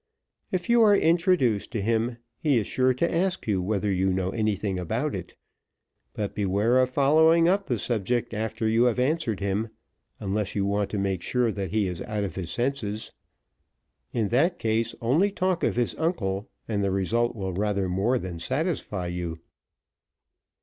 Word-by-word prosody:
If 180 -2 -2
you 235 0 +5
are 205 -2 +6
introduced 165 - +2
to 115 - -1
him 115 +2 0 0.2
he 150 -6 +2
is 110 - +1
sure 130 +4 +2
to 130 +7 0
ask 185 +2 0
you 100 -4 +1
whether 100 +1 0
you 95 +1 +1
know 95 0 -1
anything 105 -3 -1
about 90 - -2
it; - - -6 0.8
but 105 -2 -3
beware 105 +5 +2
of 130 0 +3
following 160 +5 +4
up 195 +2 +2
the 120 - 0
subject 115 +2 -1
after 110 +1 -2
you 115 +2 +3
have 120 -1 +2
answered 125 - 0
him, 100 +3 -1 0.5
unless 100 +1 -2
you 100 -1 +1
want 100 0 0
to 105 - -3
make 95 -2 -1
sure 125 +3 +1
that 100 -3 -4
he 105 +1 +1
is 90 -2 -4
out 105 -1 -3
of 95 -5 -3
his 90 -2 -5
senses. 120 -4 -2 1.0
In 110 -4 0
that 160 +9 +2
case, 115 +1 0
only 145 - +3
talk 185 -3 -1
of - - +1
his 120 -1 0
uncle, 105 - -1 0.2
and 105 -3 -1
the 100 - +1
result 115 +6 0
will 95 -3 -3
rather 100 0 0
more 100 +8 +1
than 90 -6 -5
satisfy 130 - -2
you." 85 -2 -4
110 Hz, 175 wpm, -26 LUFS, 100-130 Hz, 1.0 s, are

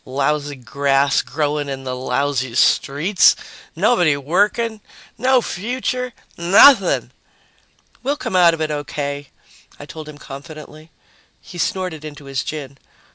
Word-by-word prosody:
"Lousy 145 +2 -1
grass 135 +2 +1
growing 145 +2 -2
in 135 -1 -5
the 130 -1 -4
lousy 130 -1 -1
streets, 155 +10 +3 0.4
nobody 175 -12 +3
working, 210 - 0 0.3
no 255 +1 +2
future, 250 +6 -3 0.2
nothing!" 190 +4 +5 0.9
"We'll 280 +3 -1
come 190 - -4
out 175 -2 +5
of 160 - -8
it 155 -1 -1
okay," 145 -1 -4 0.5
I 145 - -9
told 155 +1 -9
him 150 - -11
confidently. 155 +2 -11 0.5
He 175 - -11
snorted 180 -3 -2
into 150 -2 -9
his 135 -2 -3
gin. 140 -3 -7
150 Hz, 125 wpm, -19 LUFS, 140-185 Hz, 0.9 s, nothing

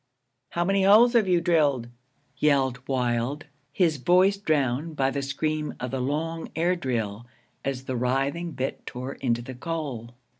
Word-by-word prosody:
'How 175 0 -1
many 195 +1 +2
holes 215 +5 +6
have 225 -5 +4
you 175 -2 +3
drilled?' 150 -8 +2 0.5
yelled 135 -4 +2
Wild, 125 +2 -1 0.3
his 160 -2 +2
voice 180 +9 +4
drowned 155 -3 0
by 135 -2 +1
the 140 - -2
scream 155 +2 -2
of 125 0 -4
the 135 -1 -2
long 160 +5 -2
air 175 +3 +2
drill 115 - -3 0.4
as 135 -1 -3
the 130 -1 -4
writhing 135 +7 -1
bit 130 0 -4
tore 130 +2 -5
into 120 -2 -1
the 130 - -7
coal. 130 -5 -5
140 Hz, 155 wpm, -26 LUFS, 125-165 Hz, 0.5 s, holes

